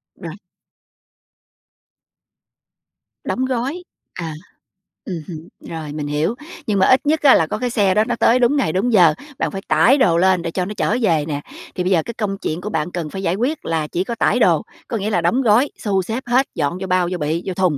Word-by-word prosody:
Rồi. 170 -4 -8 2.9
Đóng 260 - -1
gói. 265 +7 -2 0.3
À. 165 -3 -5 0.7
Ừm 185 - -4
hứm. 165 -1 -8
Rồi, 155 -3 -7
mình 150 -1 -4
hiểu, 150 +9 -1 0.3
nhưng 205 -3 +1
mà 190 - +5
ít 260 +2 +4
nhất 310 +1 +2
á 280 -3 +7
là 160 - +2
có 210 - -3
cái 250 - -1
xe 205 -5 +2
đó 215 - +3
nó 240 +1 -2
tới 240 +2 +3
đúng 245 +4 +3
ngày 255 - +1
đúng 220 +6 0
giờ, 175 -6 +6 0.3
bạn - - -1
phải 195 -1 -5
tải 270 +5 +4
đồ 170 -11 +3
lên 185 0 +3
để 165 0 -4
cho 180 +1 -2
nó 210 - -5
chở 220 - +1
về 165 -9 +2
nè. 145 -1 -3 0.3
Thì 180 - -1
bây 185 - 0
giờ 170 -4 +3
cái 235 - -5
công 205 -3 -3
chuyện 165 0 -4
của 210 - -4
bạn 160 -2 -2
cần 170 -4 -4
phải 190 +4 -6
giải 175 - +1
quyết 260 +9 -2
là 160 -2 -1
chỉ 175 - -2
có 235 +4 -4
tải - - +1
đồ, - - +4 0.3
có 230 - -2
nghĩa 210 +1 -2
là 175 -5 +1
đóng 175 +11 +2
gói, 240 +3 +3
xu 195 -3 0
xếp 225 +7 -4
hết, 255 +3 +2
dọn 150 +5 -1
vô 190 - -3
bao, 185 -1 +2
vô 180 - -2
bị, 160 +2 -2
vô 190 - -3
thùng, 180 -5 +1
190 Hz, 230 wpm, -19 LUFS, 165-235 Hz, 2.9 s, á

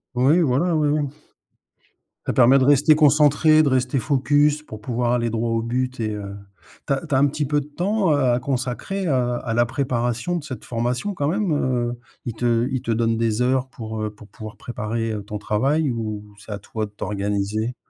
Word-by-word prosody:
Oui, 140 +8 +4
voilà, 160 +4 +2
oui, 155 -1 +2
oui. 145 -1 +1 1.2
Ça - - -1
permet 130 +2 +6
de 130 - +3
rester 145 +2 +5
concentré, 150 +1 +5
de 145 - +2
rester 130 0 +1
focus 145 +2 +2
pour 110 -7 -10
pouvoir 120 +1 -1
aller 120 -1 +1
droit 115 +1 -1
au 115 0 +1
but 125 +2 -2
et 110 -2 -1
heu, 100 -1 -6 0.5
tu 140 - +1
as 135 +4 -3
tu 145 - 0
as - - +4
un 140 +2 +4
petit 150 +1 -2
peu 145 +1 +1
de 140 - -11
temps, 185 +4 0
heu, 145 - +2
à 120 - +1
consacrer 135 +9 -3
à 125 -4 +1
à 115 - -4
la 120 +1 +3
préparation 120 +3 -1
de 170 - -3
cette 130 -7 -8
formation, 125 - -2
quand 145 -6 -1
même, 195 +1 0
heu? 120 -4 -1 0.3
Ils 120 - -3
te 120 +1 +1
ils 130 -2 -2
te 115 - -3
donnent 115 0 +1
des 115 0 0
heures 130 +1 +1
pour, 110 -3 -6
heu, 105 - -1
pour 105 0 -15
pouvoir 110 0 -10
préparer, 115 -1 -3
heu, 105 -1 -5
ton 105 +1 -6
travail 135 +9 0
ou 105 -3 -5
c'est 105 +1 -12
à 100 - -4
toi 110 +2 -4
de 105 - -13
t'organiser? 105 +3 -2
125 Hz, 210 wpm, -22 LUFS, 115-145 Hz, 1.2 s, permet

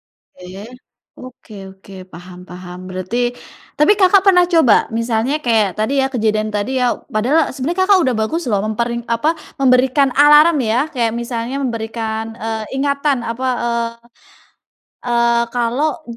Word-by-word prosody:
Baik, 195 +7 -13 0.4
oke - - -12
oke 250 -3 -13 0.2
oke, 195 0 -15 0.2
paham 180 +1 -12
paham. 180 0 -10
Berarti 230 +7 -3 0.4
tapi, 300 +7 +5
Kakak, 385 0 +5
pernah 360 -2 +5
coba 325 - +3
misalnya 230 +3 -1
kayak 220 -6 +1
tadi 270 +6 0
ya 265 - +1
kejadian 215 -2 -1
tadi 255 +6 -2
ya 245 -1 +1 0.2
padahal 265 +9 +1
sebenarnya, 325 +8 -3
Kakak, 385 0 +4
udah 255 - +1
bagus 325 +10 -2
loh 200 -2 +1
memper 220 +2 -2 0.2
apa, 295 +8 +1 0.2
memberikan 265 +1 +3
alarm 295 +3 +6
ya, 225 +2 0
kayak 230 -4 -1
misalnya 235 +2 -4
memberikan, 225 -2 -4
eee, 220 0 -4
ingatan, 280 -1 0
apa, 230 +3 -4 1.4
eee, 235 -1 -1
kalau 275 +8 -1
240 Hz, 135 wpm, -17 LUFS, 220-280 Hz, 1.4 s, alarm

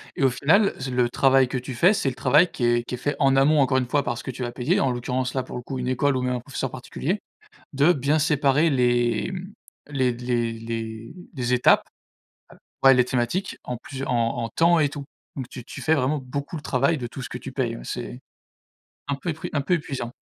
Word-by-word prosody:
et - - -1
au 135 - +6
final, 195 - +3
ce 130 0 -4
le 125 -1 +2
travail 135 +1 +4
que 125 - -3
tu 125 +1 -7
fais, 180 - +5
c'est 140 - 0
le 130 - -7
travail 150 +9 +4
qui 125 - -5
est 120 0 +2
qui 125 - -5
est - - -9
fait 145 +4 -2
en 135 -1 +4
amont 145 +3 +4
encore 135 -1 +3
une 125 -2 0
fois 145 +2 +1
parce 120 - -3
que 130 - -4
tu 125 +1 -6
vas 120 - -3
payer, 145 +11 0
en 135 - +2
l'occurrence 125 +1 -2
là, 130 -1 -1
pour - - -7
le - - -5
coup, 130 +2 -6
une 125 0 -2
école 135 +2 +1
ou 130 - 0
même 125 0 0
un - - -2
professeur 135 0 -4
particulier, 145 +9 -3 0.5
de 145 +5 +4
bien 145 +1 +1
séparer 150 +1 +3
les, 120 +2 +1
mmh, 190 +2 -7 0.4
les 130 -3 +1
les 120 -1 -1
les 115 +2 -6 0.2
les 125 -3 -2
étapes, 125 - +5 1.0
heu, - - +9
ouais, 135 - +8
les 125 -1 +4
thématiques, 125 +10 -1
en 125 - -4
plusieurs 135 +2 -6
en 120 -1 0
en - - -3
temps 170 +1 +4
et 150 -2 +3
tout. 145 0 -7 0.3
Donc 130 -3 -5
tu 125 - -9
tu - - -9
fais 160 - +2
vraiment 145 +1 +1
beaucoup 140 +5 -5
le 150 - -7
travail 140 +5 +1
de 125 - -4
tout 135 - -8
ce - - -6
que - - -5
tu - - -8
payes, - - -1
ouais, - - -10
c'est - - -6 0.9
un 140 - 0
peu 170 +5 -4
épru 155 - -5
un 145 - +1
peu 180 - +1
épuisant. 135 -7 -4
130 Hz, 245 wpm, -24 LUFS, 125-145 Hz, 1.0 s, heu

